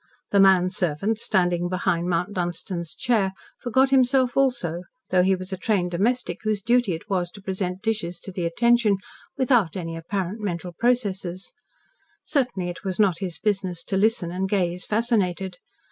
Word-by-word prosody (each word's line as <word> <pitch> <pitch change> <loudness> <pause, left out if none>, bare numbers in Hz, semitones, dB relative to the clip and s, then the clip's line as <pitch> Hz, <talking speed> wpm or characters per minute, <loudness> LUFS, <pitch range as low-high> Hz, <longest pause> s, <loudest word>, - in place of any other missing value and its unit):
The 200 - +4
manservant, 185 +1 +3
standing 175 -4 +1
behind 180 -1 0
Mount 180 +3 0
Dunstan's 175 -1 -4
chair, 210 -6 +1 0.3
forgot 260 +3 +2
himself 255 -1 +3
also, 215 -11 +1 0.3
thought 180 -1 +4
he 190 0 +3
was 185 +1 -7
a - - -3
trained 185 -3 0
domestic 235 +8 0
whose 215 -2 -1
duty 235 -5 +2
it 165 - -10
was 185 -4 -1
to 200 - -13
present 190 -1 -3
dishes 210 -6 -2
to 195 - -6
the 180 -2 -3
attention 235 +2 +3 0.4
without 235 - +2
any 165 -2 -4
apparent 190 +4 -3
mental 180 -4 -4
processes. 195 -4 -1 0.7
Certainly 245 - -1
it 175 - -8
was 190 -3 -3
not 195 -6 +3
his 180 -5 -4
business 190 -5 -1
to - - -3
listen, 200 -3 +2
and 190 +2 -2
gaze 180 -3 0
fascinated. 195 -5 0
190 Hz, 160 wpm, -24 LUFS, 175-220 Hz, 0.7 s, The